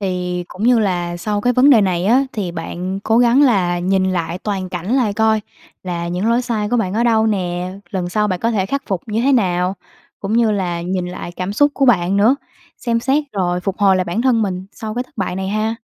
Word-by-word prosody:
Thì 180 -2 -2
cũng 195 - -8
như 245 0 +5
là 175 -5 -1
sau 205 +3 -2
cái 245 +4 +2
vấn 260 +4 +5
đề 230 -5 +7
này 180 -3 0
á, 255 +5 +4
thì 190 -5 -3
bạn 180 +3 -5
cố 225 +3 +2
gắng 245 +4 +5
là 185 -9 +2
nhìn 190 +1 +1
lại 170 0 -2
toàn 190 -2 -3
cảnh 180 +5 -4
lại 225 -6 +1
coi 220 0 +2 0.4
là 170 -2 -4
những 185 +6 -1
lỗi 240 +2 +2
sai 215 -4 -2
của 245 - +1
bạn 195 -5 -1
ở 235 - +1
đâu 225 -2 +3
nè, 180 -3 -2 0.2
lần 185 -4 -2
sau 210 +3 0
bạn 185 -2 -2
có 230 - +1
thể 200 -5 0
khắc 280 +6 -2
phục 190 -4 -2
như 220 +1 -1
thế 275 +1 +3
nào. 185 -5 +1 0.5
Cũng 200 +2 -3
như 230 -2 +3
là 180 -4 -2
nhìn 180 0 -2
lại 180 -1 -7
cảm 185 +2 -4
xúc 290 +7 +3
của 275 - +2
bạn 190 -4 +3
nữa, 225 +7 +4 0.4
xem 230 -1 -1
xét 280 +4 +1
rồi 180 -2 -1
phục 195 +1 -3
hồi 195 -2 +4
lại 185 - 0
bản 180 +7 -2
thân 240 -4 +3
mình 185 -2 -3
sau 215 -1 -6
cái 245 - -1
thất 255 - -29
bại 190 -3 -2
này 190 0 -3
ha. 215 +2 -1
200 Hz, 245 wpm, -18 LUFS, 180-230 Hz, 0.5 s, đề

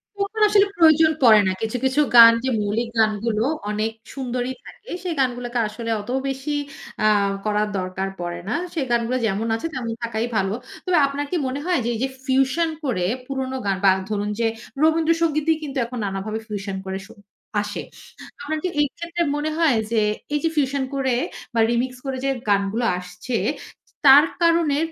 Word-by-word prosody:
পুরাপুরি 405 +2 -1
আসলে 410 -1 +5
প্রয়োজন 320 -1 +6
পড়ে 220 -3 +8
না, 190 - +2
কিছু, 225 +2 -2
কিছু 265 +3 +3
গান 230 -1 +11
যে 265 - 0
মৌলিক 220 +3 -1
গানগুলো 215 0 +1 0.3
অনেক 215 +1 -1 0.2
সুন্দরই 255 -1 -3
থাকে, 460 - -14
সেই 355 - -2
গানগুলোকে 245 -2 -1
আসলে 230 +2 -5
অত 210 - -12 0.2
বেশি 270 +2 -3 0.5
আ - - +6 0.4
করার 210 0 +1
দরকার 185 +1 -3
পড়ে 175 0 -4
না। 225 - 0 0.2
সেই 305 -6 -1
গানগুলো 235 +2 +1
যেমন 215 +2 -1
আছে, 225 +9 -3
তেমন 240 -3 -3
থাকাই 230 0 -2
ভালো। 195 0 +1 0.3
তবে 365 -2 +2
আপনার 280 +1 -3
কি - - 0
মনে 260 +2 -3
হয়, 360 -6 +2
যে - - 0
এই - - -5
যে 265 - 0 0.2
ফিউশন 270 +5 +2
করে 210 -11 0 0.2
পুরোনো 265 -1 -3
গান 195 -1 +1
বা 195 - +7 0.2
ধরুন 205 0 -1
যে, 230 - +2 0.4
রবীন্দ্রসঙ্গীতই 320 -1 +2
কিন্তু 280 -2 -5
এখন 250 +2 -7
নানাভাবে 200 +3 -3
ফিউশন 200 -2 -4
করে 190 0 -3
স - - -27 0.5
আসে। 210 0 -5 0.6
আপনার 310 +2 -3
কি 365 - 0
এই 290 - +3
ক্ষেত্রে 340 0 -4
মনে 295 +1 -1
হয় 315 -8 +3
যে, 225 -2 +2 0.3
এই 295 - +2
যে 325 - +2
ফিউশন 275 -1 +1
করে 265 -3 +1 0.4
বা 230 - 0
রিমিক্স 250 +1 -1
করে 265 -1 -3
যে 275 - +2 0.2
গানগুলো 200 +4 +1
আসছে, 180 +6 -5 0.7
তার 285 +3 +9 0.2
কারণে 335 -4 +3
250 Hz, 175 wpm, -22 LUFS, 215-295 Hz, 0.7 s, গান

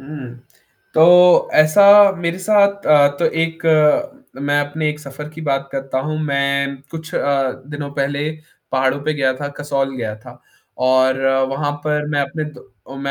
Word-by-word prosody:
हुँ, 135 -3 -9 0.6
तो 180 +2 +5
ऐसा 155 +6 +5 0.4
मेरे 170 +1 -3
साथ 200 0 +1
अ, 145 -2 +5
तो - - -1
एक 165 0 -2
अ, 165 - +1
मैं 145 +1 0
अपने 150 +2 -3
एक 150 - -8
सफ़र 150 +1 -9
की 155 +1 -12
बात 135 -1 -1
करता 135 -1 -3
हूँ। 155 +3 -4
मैं 140 -1 -1
कुछ 160 -1 -9
अ, 135 -2 0 0.2
दिनों 145 -1 -6
पहले 140 +1 -2 0.4
पहाड़ों 130 +1 0
पे 155 - 0
गया 135 -3 0
था, 145 +2 -6
कसौल 140 -2 -2
गया 110 -3 -4
था 125 +3 -15 0.4
और 130 +1 +2 0.3
वहाँ 145 +2 -2
पर 150 -1 -1
मैं 145 -1 0
अपने 140 +3 -4
मैं 150 - -9
दो 130 +1 -15
145 Hz, 165 wpm, -18 LUFS, 135-155 Hz, 0.6 s, तो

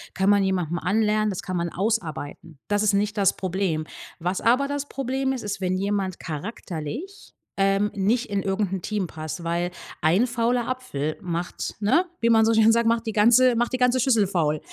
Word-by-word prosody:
kann 190 +1 +2
man 200 -1 +4
jemanden 175 -3 -1
anlernen, 215 +3 +1
das 190 - -4
kann 185 -1 -3
man 170 0 -1
ausarbeiten. 170 -6 -3
Das 205 0 +2
ist 210 -1 +3
nicht 205 +1 0
das 195 -3 +3
Problem. 185 -4 -1 0.3
Was 180 +3 -2
aber 255 +4 +3
das 285 0 -3
Problem 265 0 -2
ist, 255 - -5
ist, 200 -1 -4
wenn 185 0 0
jemand 195 -1 -2
charakterlich, 185 - -6 0.2
ähm, 195 +1 +2
nicht 225 +6 0
in 200 -1 -1
irgend 195 0 -1
'n 190 - -3
Team 205 0 -2
passt, 155 +1 -7
weil 170 +1 -1 0.3
1 175 +9 +3
fauler 240 0 0
Apfel 205 - -3
macht, 175 0 -4
ne, 215 - +3 0.2
wie 235 - +2
man 225 -1 +5
so 225 - +3
schön 225 0 +5
sagt, 235 0 +2
macht 230 0 +1
die 220 - -2
ganze 235 +4 +5
macht 240 +1 0
die 255 - -1
ganze 250 0 +3
Schüssel 230 -6 +3
faul. 155 -5 0
205 Hz, 195 wpm, -24 LUFS, 180-230 Hz, 0.3 s, man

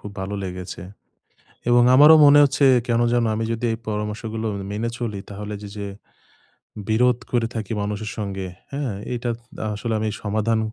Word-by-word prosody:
খুব 105 - -8
ভালো 100 +2 -4
লেগেছে। 90 -1 -6 0.9
এবং 120 0 +6
আমারও 150 +3 +9
মনে 145 0 +8
হচ্ছে, 140 0 +3 0.2
কেন 115 0 +2
জানো 120 -1 +2
আমি 115 - -2
যদি 115 +1 -2
এই 110 - -2
পরামর্শগুলো 110 +1 -3 0.2
মেনে 110 +3 -2
চলি 105 -5 -4
তাহলে 105 +1 -6
যে, 105 - -7
যে 100 -1 -4 1.0
বিরোধ 120 +3 +3
করে 120 -2 +1
থাকি 110 -1 -4
মানুষের 105 +1 -3
সঙ্গে, 95 -3 -4 0.3
হ্যাঁ? 140 -4 -2 0.2
এটা 120 0 -2 0.3
আ - - -2
আসলে 110 +2 -3
আমি 110 0 -1
সমাধান 110 +2 0
110 Hz, 160 wpm, -22 LUFS, 105-120 Hz, 1.0 s, আমারও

